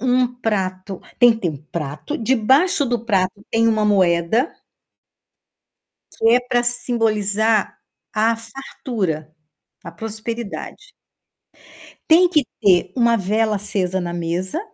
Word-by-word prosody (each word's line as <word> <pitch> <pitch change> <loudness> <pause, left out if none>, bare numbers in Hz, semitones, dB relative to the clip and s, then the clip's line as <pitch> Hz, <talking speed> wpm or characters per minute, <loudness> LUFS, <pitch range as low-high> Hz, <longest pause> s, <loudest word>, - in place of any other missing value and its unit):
um 255 0 +2
prato 195 -6 -3 0.2
tem 240 -1 +7
que 225 - -7
ter 175 - +1
um 150 - -7
prato, 150 - -6
debaixo 265 +8 +2
do 240 -3 -2
prato 190 -2 0
tem 230 0 +3
uma 215 -1 +1
moeda 190 - +2 1.7
que 225 - +3
é 245 +1 +5
pra 245 -1 0
simbolizar 220 -3 0 0.4
a 225 +2 +2
fartura, 225 - -5 0.5
a 170 - -7
prosperidade. 225 - -7 1.2
Tem 350 +3 +6
que 305 -6 +2 0.2
ter 185 -3 +3
uma 235 -1 +3
vela 215 +2 0
acesa 190 -2 -2
na 175 -1 -4
mesa, 175 - -3
220 Hz, 120 wpm, -20 LUFS, 185-245 Hz, 1.7 s, tem